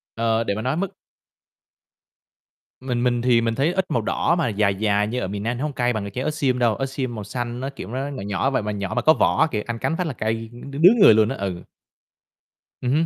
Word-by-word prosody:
Ờ, 115 0 +1
để 100 -3 -2
mà 110 - -3
nói 130 +7 -1
mức 195 0 -3 1.9
Mình 125 -2 -2
mình 120 -1 +1
thì 120 -2 +3
mình 115 0 0
thấy 150 +7 +1
ớt 190 -3 -1
màu 120 - +1
đỏ 170 +9 +1
mà 165 - +1
dài 100 -1 +1
dài 105 0 +1
như 125 +3 -2
ở 95 - -2
miền 100 +1 -5
Nam 120 +2 -2
nó 130 - -3
hông 150 -2 -2
cay 120 -1 0
bằng 100 -2 -4
trái 125 +6 -4
ớt 155 - -1
xiêm 130 -4 0
đâu, 115 -3 +2
ớt 135 - -2
xiêm 130 -3 -4
màu 105 - -5
xanh 120 +3 -4
nó, 135 +1 -3
kiểu, 135 -9 -9
nó 130 +4 -3
nhỏ 140 -5 -6
nhỏ 100 +6 0
vậy 135 - 0
mà - - -8
mà 105 - -1
nhỏ 100 -2 -4
mà - - +1
có 155 - +6
võ - - +2
á - - +5
kìa, 105 - -1
ăn 115 -1 -4
cắn 165 - -1
phát 180 - -1
là 145 - -3
cay 110 0 -3
đ 120 +3 -10
đứng 185 +10 +6
người 115 - +9
luôn 110 0 +3
á, - - -3
ừ. 95 -3 -4 1.2
Ừm 125 0 -1
hứm. 160 +3 +2
120 Hz, 270 wpm, -23 LUFS, 110-135 Hz, 1.9 s, người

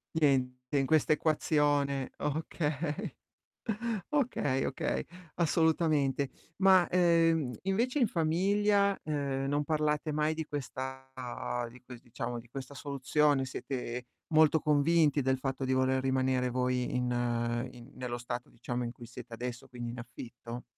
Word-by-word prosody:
Niente 130 -3 +1
in 135 - +3
quest'equazione 145 -2 +2
o - - -2
okay. 150 -1 -2 1.0
Okay, 240 - +1
okay, - - -1 0.3
assolutamente. 155 -5 +2 0.3
Ma, 190 -2 +6
ehm, 165 -6 +3
invece, 230 +9 +1
in 240 - +5
famiglia, 200 +5 +2
ehm, 140 -3 -1
non 145 +1 +1
parlate 150 0 0
mai 155 +1 +1
di 160 0 -3
questa 130 -2 -5 0.6
di 125 +2 -14
ques 125 -1 -11
diciamo, 120 0 -4
di 120 - -18
questa 135 +2 -7
soluzione? 140 0 +1
Siete 125 -2 -4 0.3
molto 155 0 +6
convinti 150 0 +3
del 130 0 +1
fatto 135 0 -2
di 130 - 0
voler 130 0 +2
rimanere 130 -1 +1
voi 125 0 0
in 125 0 0 0.6
in 125 +2 -13
nello 125 -1 -4
stato, 120 +1 -5
diciamo, 120 +1 -4
in 120 - -4
cui 120 -1 -11
siete 125 0 -10
adesso, 120 +1 -5
quindi 120 -1 -5
in 120 - -7
affitto? 120 0 -8
140 Hz, 135 wpm, -31 LUFS, 125-155 Hz, 1.0 s, Ma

